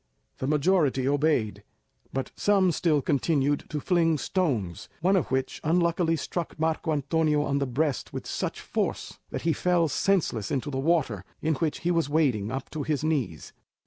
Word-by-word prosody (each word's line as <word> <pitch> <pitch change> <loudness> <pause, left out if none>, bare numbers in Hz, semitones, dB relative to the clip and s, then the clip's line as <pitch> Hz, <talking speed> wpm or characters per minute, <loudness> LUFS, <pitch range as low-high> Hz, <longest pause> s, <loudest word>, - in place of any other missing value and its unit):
The 130 - -2
majority 150 -3 +2
obeyed, 145 -6 +1 0.5
but 135 0 -3
some 195 -3 +3
still 155 -3 +1
continued 145 0 +1
to 150 - -2
fling 165 -1 +2
stones, 125 - -1
one 185 +4 +3
of 180 - +1
which 130 0 -2
unluckily 170 0 +2
struck 165 +1 -4
Marco 160 +1 0
Antonio 150 +1 +1
on 140 -1 0
the 140 - -1
breast 135 +1 -1
with - - -6
such - - -3
force - - -3
that - - -5
he 165 0 +2
fell 175 -1 +2
senseless 150 - 0
into 145 +1 -2
the 135 - -2
water, 135 - +1 0.2
in 160 +1 +1
which 155 +1 -2
he 175 - +1
was 165 -4 +1
wading 130 -10 +1
up 135 - -5
to 155 - -4
his 145 0 -1
knees. 140 - -2
150 Hz, 170 wpm, -27 LUFS, 135-165 Hz, 0.5 s, some